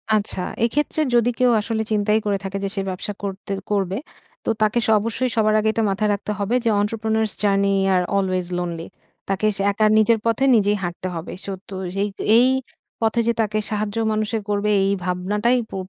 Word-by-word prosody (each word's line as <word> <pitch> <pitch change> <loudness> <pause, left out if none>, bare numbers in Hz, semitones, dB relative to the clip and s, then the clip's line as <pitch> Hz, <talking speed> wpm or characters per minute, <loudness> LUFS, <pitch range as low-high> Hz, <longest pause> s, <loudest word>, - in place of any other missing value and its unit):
আচ্ছা, 205 -3 -2 0.2
এক্ষেত্রে 295 +6 0
যদি 240 0 +4
কেউ 250 -1 +4
আসলে 220 +1 -2
চিন্তাই 210 +1 +2
করে 200 -1 +1
থাকে 195 +1 -4
যে 195 - -1
সে 195 - -1
ব্যবসা 195 +3 -4
করতে 200 0 -5 0.2
করবে, 195 -1 0 0.5
তো - - -1
তাকে 215 +3 +3
স - - 0
অবশ্যই 230 +4 -1
সবার 215 -1 +3
আগে 220 0 +1
এটা 225 - 0
মাথায় 210 +2 0
রাখতে 205 +1 -4
হবে 205 +5 0
যে, - - +4
Entrepreneurs 220 0 0
journey 200 -1 +3 0.2
are 180 -1 +2
always 185 -2 0
lonely। 170 -1 -4 0.4
তাকে 195 +2 0
সা - - -2
একা 215 +2 +1
নিজের 220 +1 +4
পথে 230 +4 +1
নিজেই 205 -1 +3
হাঁটতে 175 +1 -4
হবে। 165 - -6
So 200 - -5 0.2
তো 195 - -6 0.3
এ - - +2 0.3
এই 250 +2 +6 0.5
পথে 225 +1 +1
যে 235 - +3
তাকে 215 0 -1
সাহায্য 210 0 -2 0.2
মানুষে 215 +1 -1
করবে, 205 +1 0 0.2
এই 195 - +2
ভাবনাটাই 205 +7 +1
পু - - -8
210 Hz, 190 wpm, -22 LUFS, 195-220 Hz, 0.5 s, এই